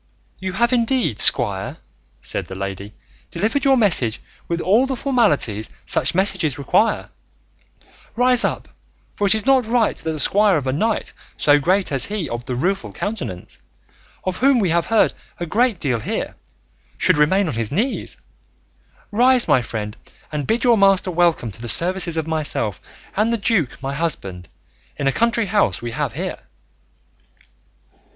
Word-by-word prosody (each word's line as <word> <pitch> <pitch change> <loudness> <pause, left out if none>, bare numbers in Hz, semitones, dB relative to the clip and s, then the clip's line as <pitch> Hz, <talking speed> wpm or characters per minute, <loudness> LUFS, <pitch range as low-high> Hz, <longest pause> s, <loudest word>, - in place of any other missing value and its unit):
"You 190 0 -4
have 235 +5 +1
indeed, 240 - +1
squire," 95 -4 +3 0.5
said - - -3
the 95 - -8
lady, 100 +1 -6 0.3
"delivered 225 +7 -1
your 270 -1 +4
message 160 - +1 0.3
with 170 0 -2
all 220 +10 +2
the 265 - -2
formalities 205 - 0 0.2
such 145 - +1
messages 180 -7 0
require; 145 - 0 1.1
rise 250 0 +5
up, - - -2 0.5
for 205 - -1
it 195 - +7
is 215 - -2
not 265 -4 +3
right 230 -1 +1
that 160 - -4
the 155 - -5
squire 200 +3 +3
of 140 - -4
a 130 - -1
knight 215 +9 -2 0.2
so 145 0 +4
great 185 +5 +1
as 135 -2 +2
he 205 -6 -3
of 120 -1 -6
the 125 - -4
Rueful 190 +9 -2
Countenance, 195 - -6 0.6
of 185 -1 -3
whom 270 0 +3
we 195 -7 +1
have 170 0 +1
heard 225 -1 +2 0.3
a 175 - -3
great 220 +3 +1
deal 125 -6 -1
here, - - -4 0.6
should - - +3
remain 185 +6 +2
on 155 - -3
his 115 -2 -3
knees; 225 - -2 0.9
rise, 250 +3 +4
my 130 - +3
friend, 105 -3 -6 0.4
and 150 -3 -4
bid 230 +2 0
your 235 -4 +4
master 195 -1 +3
welcome 170 -9 +1
to 110 - -11
the 120 - -4
services 170 - +3
of 160 - -1
myself 150 - -2 0.3
and 215 +3 +1
the 235 - 0
duke 200 - -1
my 135 +1 -3
husband, 100 - -4 0.5
in - - -3
a 135 - +3
country 230 - +1
house 200 - +1
we 120 0 -6
have - - -3
here." - - -5
180 Hz, 165 wpm, -20 LUFS, 135-225 Hz, 1.1 s, it